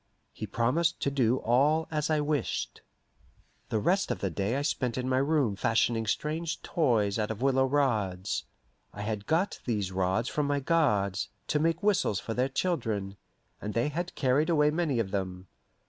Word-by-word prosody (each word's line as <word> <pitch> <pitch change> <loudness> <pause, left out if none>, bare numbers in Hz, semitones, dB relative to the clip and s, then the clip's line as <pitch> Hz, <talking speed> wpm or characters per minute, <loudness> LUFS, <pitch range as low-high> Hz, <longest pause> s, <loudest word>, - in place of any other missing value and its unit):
He 110 - -6
promised 150 - +1
to 140 - +1
do 130 -3 +2
all 145 +8 +2
as 150 0 -1
I 155 -1 +2
wished. 145 -1 -2 0.9
The 110 - 0
rest 185 - +1
of - - -1
the 95 - -2
day 100 +8 -1
I 140 - -1
spent 130 -5 -1
in 125 0 -2
my 130 0 +2
room 140 -6 +1
fashioning 115 +2 +1
strange 155 +8 -2
toys 115 -10 +1
out 105 - -1
of 110 +2 -4
willow 135 -1 +3
rods. 110 -10 0 0.5
I 105 - -6
had 105 -1 -3
got 170 +6 +1
these 105 -6 -1
rods 95 +5 0
from 150 +1 -1
my 145 0 +1
guards, 130 - +1 0.2
to 150 - +2
make 165 +4 0
whistles 195 - +2
for 115 - -4
their 125 +3 +1
children, 110 - -1 0.5
and 105 +1 -5
they 115 +5 +1
had 175 +4 -4
carried 140 +4 +2
away 150 -3 +4
many 155 -5 0
of 105 -5 -1
them. 95 -2 -3
130 Hz, 180 wpm, -29 LUFS, 105-150 Hz, 0.9 s, away